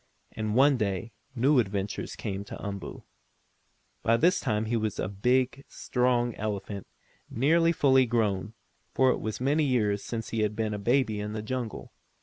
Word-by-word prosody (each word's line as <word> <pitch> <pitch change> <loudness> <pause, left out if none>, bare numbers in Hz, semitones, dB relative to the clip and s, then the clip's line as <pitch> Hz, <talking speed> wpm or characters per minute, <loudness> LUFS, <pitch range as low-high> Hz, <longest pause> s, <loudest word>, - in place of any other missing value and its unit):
And 110 -1 -3
one 135 +1 +5
day 100 0 -2 0.2
new 130 +3 +4
adventures 100 -2 -2
came 100 0 -4
to - - -8
Umboo. 100 -2 -6 1.0
By 115 +1 +3
this 175 +8 +3
time 105 0 -1
he 115 +2 -1
was 110 -2 -1
a - - -1
big, 125 +7 +1
strong 125 -1 0
elephant, 100 -1 -4 0.4
nearly 165 +7 +3
fully 135 -5 +4
grown, 110 -2 0 0.4
for 130 -1 +5
it - - -1
was 110 -1 -4
now 125 - -3
many 150 +3 +3
years 105 -7 +1
since 115 -2 -5
he 115 - -2
had 105 -1 0
been 110 -1 -1
a 105 - -3
baby 115 0 +1
in 105 +1 -4
the 110 -1 -4
jungle. 120 0 -4
115 Hz, 170 wpm, -28 LUFS, 105-130 Hz, 1.0 s, one